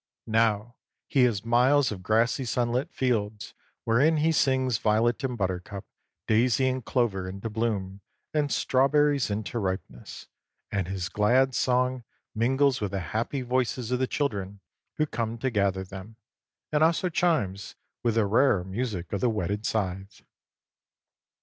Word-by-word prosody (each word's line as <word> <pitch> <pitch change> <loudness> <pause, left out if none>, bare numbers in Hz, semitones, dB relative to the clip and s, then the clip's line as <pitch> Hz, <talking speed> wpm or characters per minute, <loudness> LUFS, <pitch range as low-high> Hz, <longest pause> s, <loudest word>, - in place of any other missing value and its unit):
Now 115 +1 +1 0.3
he 130 -3 +3
has 110 -3 -1
miles 130 +4 +3
of 95 -3 -6
grassy 115 +7 +1
sunlit 125 +2 -1
fields 110 -5 -2 0.3
wherein 140 +8 +3
he 155 +2 +2
sings 130 -5 +1
violet 115 +4 +1
and 125 -2 -2
buttercup, 95 0 -3 0.4
daisy 120 +4 +2
and 130 -1 -1
clover 105 -7 -1
into 100 +4 -6
bloom 100 -4 -2 0.3
and 150 -2 0
strawberries 140 0 +2
into 105 +2 -3
ripeness, 95 - -5 0.5
and 95 -3 -1
his 95 -2 -3
glad 125 +8 +2
song 125 0 +1 0.3
mingles 130 +3 +2
with 105 - -1
the 100 +1 -3
happy 120 +5 -1
voices 125 -1 -1
of 125 - +1
the 130 - +1
children 100 -10 -3 0.4
who 155 - +2
come 115 -5 -3
to 130 +2 -2
gather 100 -3 0
them, 95 +3 -10 0.6
and 150 0 +3
also 170 +3 +2
chimes 155 - 0 0.3
with 115 -2 0
the 110 -2 +3
rarer 110 -2 +3
music 95 -3 -4
of 100 - -1
the 125 - +3
whetted 105 0 -2
scythe. 95 -2 -3
115 Hz, 145 wpm, -27 LUFS, 100-130 Hz, 0.6 s, he